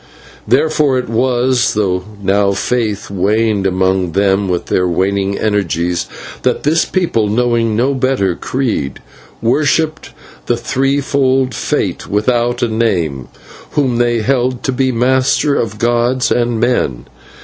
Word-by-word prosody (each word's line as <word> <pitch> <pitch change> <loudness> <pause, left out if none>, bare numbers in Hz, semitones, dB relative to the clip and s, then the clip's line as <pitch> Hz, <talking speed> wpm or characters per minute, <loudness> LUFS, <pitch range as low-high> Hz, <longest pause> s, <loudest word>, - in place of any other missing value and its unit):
Therefore 150 -2 +2
it 125 - -2
was, 125 +1 +1
though 95 -4 0 0.2
now 100 +1 +2
faith 105 -1 -2
waned 105 +1 +1
among 95 -1 0
them 100 0 +1
with 90 -1 -1
their 90 0 +1
waning 95 +3 0
energies, 90 -5 -1 0.3
that - - 0
the 155 +3 +2
people, 165 - +1
knowing 115 0 +1
no 130 +5 +1
better 130 -8 0
creed, 110 - -2 0.4
worshipped 155 +5 +1 0.4
the 120 - +1
threefold 135 0 0
Fate - - -2
without 120 +4 0
a - - +2
name, 90 - -1 0.5
whom 130 -5 +1
they 120 -1 +1
held 125 0 0
to - - 0
be 130 0 0
master 130 +4 +2
of 110 -6 -2
gods 120 +3 +1
and 120 -2 +1
men. 110 - 0
115 Hz, 125 wpm, -15 LUFS, 100-130 Hz, 0.5 s, Therefore